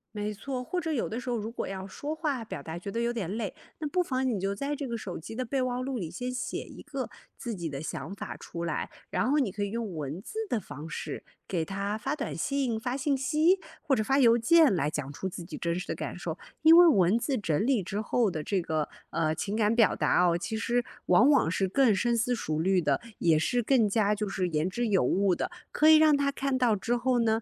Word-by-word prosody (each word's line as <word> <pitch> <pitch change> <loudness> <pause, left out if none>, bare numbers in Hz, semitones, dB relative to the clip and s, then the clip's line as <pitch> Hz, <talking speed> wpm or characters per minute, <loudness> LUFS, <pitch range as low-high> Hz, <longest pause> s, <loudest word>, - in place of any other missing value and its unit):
没 210 0 -2
错， 250 +4 -5
或 360 +8 -2
者 320 -1 -2
有 275 -7 0
的 225 - -4
时 250 - -6
候， 240 - 0
如 220 +1 -4
果 240 - -4
要 190 -1 -5
说 285 +11 -5
话 295 -7 -2
表 180 -10 -7
达 160 +3 -6
觉 190 - -6
得 230 - -2
有 235 0 0
点 210 -8 -3
累， 215 -5 -3 0.2
那 310 - -3
不 360 +5 +1
妨 260 -6 -1
你 230 -6 0
就 195 +1 -1
在 280 +7 -2
这 280 -1 -4
个 235 -1 -3
手 190 -5 -6
机 190 +7 -8
的 255 +2 -2
备 265 +3 -1
忘 250 0 -1
录 265 -2 -3
里 170 -5 -4
先 250 +9 -4
写 250 - -3
一 - - -12
个 275 -3 -5 0.3
自 240 -3 -4
己 170 -5 -4
的 140 -2 -5
想 160 +5 -5
法 - - -6
出 170 0 -6
来， 165 - -2 0.2
然 - - +1
后 295 - +3
你 260 -9 +1
可 205 +2 -3
以 200 - -2
用 220 -4 -4
文 150 +1 -4
字 390 - -7
的 235 - +1
方 150 -3 -9
式， - - -5 0.2
给 170 -4 -1
他 200 +4 -3
发 270 +7 -2
短 280 - -4
信、 270 -5 -1
发 245 +3 -2
信 280 +1 +1
息， 310 +7 +3 0.2
或 285 -5 +2
者 215 - 0
发 270 +5 +2
邮 235 -4 +6
件， 285 +3 +5
来 150 -5 +1
讲 145 -2 -4
出 190 +6 -4
自 175 - -7
己 170 - -8
真 170 0 -1
实 180 - -5
的 - - -1
感 - - -5
受。 - - -5 0.2
因 320 +1 +9
为 350 0 +9
文 200 - +4
字 265 +2 -1
整 170 -5 0
理 255 -7 +2
之 200 +4 -3
后 220 -1 +1
的 155 -3 -4
这 195 +4 0
个， 155 -2 -1 0.2
呃， 155 -1 0
情 205 +5 -3
感 215 0 +2
表 225 -3 +4
达 180 - +3
哦， 170 - +3
其 220 +6 -3
实 240 +2 0 0.2
往 220 +10 +5
往 270 - +4
是 190 +2 +1
更 235 +3 +4
深 235 +4 +1
思 240 +2 +1
熟 155 -9 -2
虑 185 +2 +3
的， 145 -4 +1 0.2
也 165 -2 +4
是 245 +10 +1
更 235 -2 +3
加， 210 0 +2
就 210 0 -2
是 190 -2 -1
言 155 0 0
之 235 +6 -1
有 195 -8 +3
物 190 +7 +2
的， - - -3 0.2
可 310 - +3
以 315 0 +9
让 310 -2 +5
他 280 0 +1
看 275 -1 -1
到 245 -4 +3
之 235 +5 -1
后 250 0 +1
呢， 225 -1 +2
225 Hz, 280 characters per minute, -28 LUFS, 185-260 Hz, 0.3 s, 因